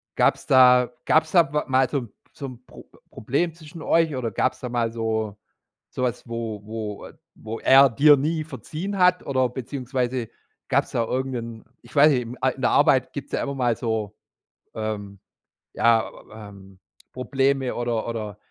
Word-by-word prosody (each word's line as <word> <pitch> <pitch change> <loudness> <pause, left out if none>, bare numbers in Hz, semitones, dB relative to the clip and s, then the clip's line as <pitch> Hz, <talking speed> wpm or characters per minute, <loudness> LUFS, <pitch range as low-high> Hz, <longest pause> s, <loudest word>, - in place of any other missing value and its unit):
gab's - - +2
da 125 -2 +6 0.2
gab's 155 0 +3
da 170 -3 +4
wa 150 0 -1
mal 130 -1 +2
so 145 - -1
'n 120 -5 -10 0.2
so 140 - -8
'n 125 -1 -12
Pro - - -14 0.3
Problem 150 +9 -1
zwischen 160 0 -12
euch 165 -1 +2
oder 120 -3 -3
gab's 130 - -1
da 125 - -4
mal 120 -1 -1
so 110 -2 -2 0.5
so 130 - -4
was, 125 -1 -2
wo 115 -3 -4
wo, 110 -1 -6
äh - - -15 0.2
wo 110 +1 -7
er 135 +1 +6
dir 145 +6 +6
nie 155 +3 -1
verziehen 170 +5 -6
hat 180 0 +3
oder 130 -2 +1
beziehungsweise 125 -1 -3 0.4
gab's - - +1
da 115 - 0
irgend 130 +2 -2
'n, 115 -1 -7 0.2
ich - - -18
weiß 150 +2 +7
nicht, 125 -1 -3
a 130 - +2
in 130 +1 -8
der 125 - +2
Arbeit 135 -3 +3
gibt's 140 - -7
ja - - 0
immer 140 0 -4
mal 120 -3 +1
so, 110 -3 -3 0.6
ähm, 105 -3 -5 0.5
ja, 115 -1 +3 0.2
ähm, 100 -3 -12 0.4
Probleme 135 +1 0
oder 120 -2 -2
oder 110 -3 -5
125 Hz, 175 wpm, -24 LUFS, 115-140 Hz, 0.6 s, weiß